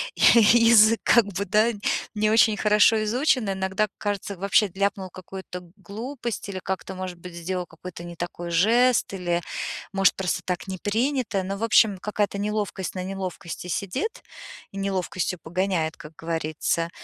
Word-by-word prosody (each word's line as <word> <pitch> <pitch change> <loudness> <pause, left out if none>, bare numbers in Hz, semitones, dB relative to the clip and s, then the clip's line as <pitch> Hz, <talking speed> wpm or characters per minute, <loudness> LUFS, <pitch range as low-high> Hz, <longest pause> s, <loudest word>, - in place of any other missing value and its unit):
я 230 - +6
язык, 230 -1 +6
как 235 -3 +5
бы, 200 +1 -3
да, 215 +5 +3 0.4
не 215 0 +2
очень 220 -2 +4
хорошо 210 +1 +4
изучен. 245 -1 +1
Иногда 190 +2 0
кажется, 205 -1 -3
вообще 200 +2 +2
ляпнул 195 -1 -1
какую-то 185 0 -9
глупость 225 +3 -6
или 190 -1 -4
как-то, 190 0 -4
может 185 -1 -6
быть, 180 0 -10
сделал 180 +1 -3
какой-то 170 +1 -10
не 175 0 -8
такой 175 0 -5
жест, 230 +6 +3
или, 175 -2 -1 0.5
может, 195 -1 +3
просто 185 -1 -2
так 180 +1 -3
не 190 -1 -4
принято, 225 -1 -1
но, 195 +1 -4
в 225 - -5
общем, 220 -3 +4
какая-то 205 -1 -2
неловкость 205 -2 -3
на 185 - -3
неловкости 185 -2 -6
сидит 205 - -3 0.5
и 195 - -9
неловкостью 185 -2 -2
погоняет, 175 -2 -1
как 160 -1 -12
говорится. 165 0 -2
195 Hz, 150 wpm, -24 LUFS, 180-215 Hz, 0.5 s, я